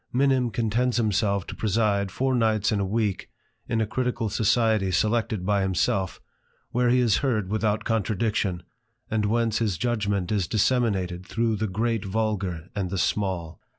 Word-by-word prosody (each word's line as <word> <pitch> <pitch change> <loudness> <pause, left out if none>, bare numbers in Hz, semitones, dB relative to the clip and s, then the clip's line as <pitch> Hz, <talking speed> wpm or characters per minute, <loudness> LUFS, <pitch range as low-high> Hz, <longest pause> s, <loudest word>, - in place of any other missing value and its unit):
Minim 130 -1 +2
contents 115 +3 0
himself 100 -3 +1
to - - -7
preside 100 -2 +1
four 130 +7 0
nights 110 -4 +2
in 105 - +1
a - - +1
week 105 0 -1 0.4
in 115 - +1
a 110 - +2
critical 120 0 -1
society 110 -1 +2
selected 105 +1 0
by 100 0 +2
himself, 95 0 0 0.5
whiere 125 0 +2
he 125 +1 +4
is 120 -5 +3
heard 110 -9 0
without 110 0 0
contradiction, 105 -4 -1 0.5
and 110 -1 +1
whence 115 0 +1
his 105 -6 0
judgment 105 -6 -1
is 100 -4 0
disseminated 105 -5 +1
through 115 -1 0
the 110 +1 -1
great 110 +2 -1
vulgar 95 -5 -2
and 95 -3 -2
the 95 - -3
small. 90 -4 -1
110 Hz, 155 wpm, -25 LUFS, 95-115 Hz, 0.5 s, he